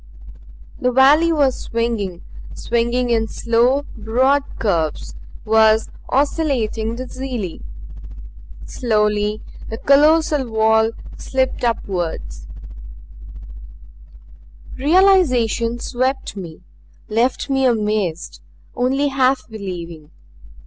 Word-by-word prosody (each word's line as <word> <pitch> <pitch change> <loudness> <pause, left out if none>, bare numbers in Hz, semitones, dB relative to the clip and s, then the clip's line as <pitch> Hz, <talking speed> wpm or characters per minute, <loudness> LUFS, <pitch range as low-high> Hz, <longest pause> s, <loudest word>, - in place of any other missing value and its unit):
The 250 - +1
valley 290 +6 +5
was 280 -5 +2
swinging 225 -6 -3 0.3
swinging 235 +1 -1
in 225 -1 +1
slow 240 +5 +1
broad 255 +6 +2 0.2
curves; 165 -8 -1 0.3
was 220 0 +3 0.2
oscillating 255 -6 0
dizzily. 255 -6 -6 1.0
Slowly 210 -2 0 0.3
the 225 - -5
colossal 295 0 +3
wall 220 0 +3 0.3
slipped 260 -1 -2
upward. 190 -8 -2 2.5
Realization 265 - +3
swept 255 +2 -2
me; 175 -5 -9 0.5
left 235 +4 0
me 270 -1 +2
amazed; 210 -7 -2 0.3
only 270 +3 +1
half 265 -1 +1
believing. 175 -8 -8
235 Hz, 80 wpm, -19 LUFS, 215-265 Hz, 2.5 s, valley